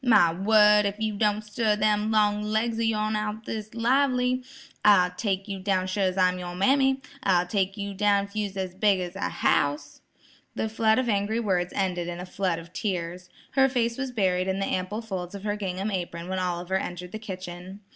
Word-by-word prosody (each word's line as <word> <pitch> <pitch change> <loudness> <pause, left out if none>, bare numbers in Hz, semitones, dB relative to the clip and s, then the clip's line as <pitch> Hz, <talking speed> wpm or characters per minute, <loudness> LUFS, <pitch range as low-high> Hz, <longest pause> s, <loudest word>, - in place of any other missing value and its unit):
My 175 -9 +5
word, 210 +2 +5
if 200 +1 -5
you 220 -1 -1
don't 210 0 +1
stir 210 0 0
them 210 0 +1
long 210 -1 +2
legs 220 +2 -1
o' - - 0
yourn 215 -1 0
out 210 0 -1
o' 220 - -14
this 215 0 -6
lively, 250 +1 +2 0.4
I'll 185 -4 +5
take 195 +1 -2
you 195 -1 -4
down 185 -1 0
sure's 185 0 0
I'm 185 -1 +3
yer 175 0 -6
mammy; 265 +6 +3 0.2
I'll 180 -6 +3
take 195 +1 -1
yer 200 0 -4
down 200 0 +2
if 200 +1 -17
you 210 -1 0
was 195 0 -11
as 185 -2 -3
big 200 0 +2
as 180 0 -5
a 200 - -2
house." 145 0 0 0.5
The 220 - -1
flood 220 0 +2
of 255 -1 +1
angry 210 +1 0
words 180 -5 0
ended 180 -3 -1
in 175 0 -5
a 180 - -5
flood 185 -2 -1
of 165 +1 -11
tears. 180 -2 -3 0.2
Her 270 0 +4
face 235 -2 0
was 265 -1 -2
buried 185 -6 0
in 190 0 0
the 195 - -1
ample 190 +5 -2
folds 190 -3 -5
of 200 - -8
her 205 -1 -1
gingham 195 0 -3
apron 175 -2 -4
when 190 0 -1
Oliver 180 +1 -1
entered 180 -1 -5
the 215 - -6
kitchen. 185 -1 -8
200 Hz, 210 wpm, -26 LUFS, 185-215 Hz, 0.5 s, My